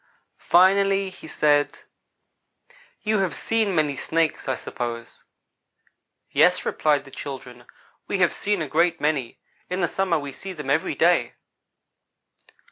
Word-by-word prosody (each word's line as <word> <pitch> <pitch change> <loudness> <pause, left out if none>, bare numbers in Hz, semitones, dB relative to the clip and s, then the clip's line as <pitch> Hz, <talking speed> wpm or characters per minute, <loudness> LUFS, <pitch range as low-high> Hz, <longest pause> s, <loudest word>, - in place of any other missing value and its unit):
Finally 195 +2 +4
he 180 - -12
said: 145 -1 +1 1.2
"You 215 -1 +1
have 190 -3 0
seen 220 -4 0
many 150 -3 +1
Snakes, 160 +3 -1
I 130 - +1
suppose?" 120 -2 -6 1.1
"Yes," - - +4
replied 145 -2 +1
the 135 - -14
children, 125 -4 -8 0.4
"we 200 - -1
have 180 -2 +3
seen 205 -4 -1
a - - -5
great 165 +3 +2
many. 145 -5 -1 0.3
In 180 +1 -2
the 175 - +2
summer 185 -1 0
we 145 -2 -5
see 190 +7 -8
them 150 -5 -4
every - - +1
day." - - +2
160 Hz, 130 wpm, -24 LUFS, 140-190 Hz, 1.2 s, Finally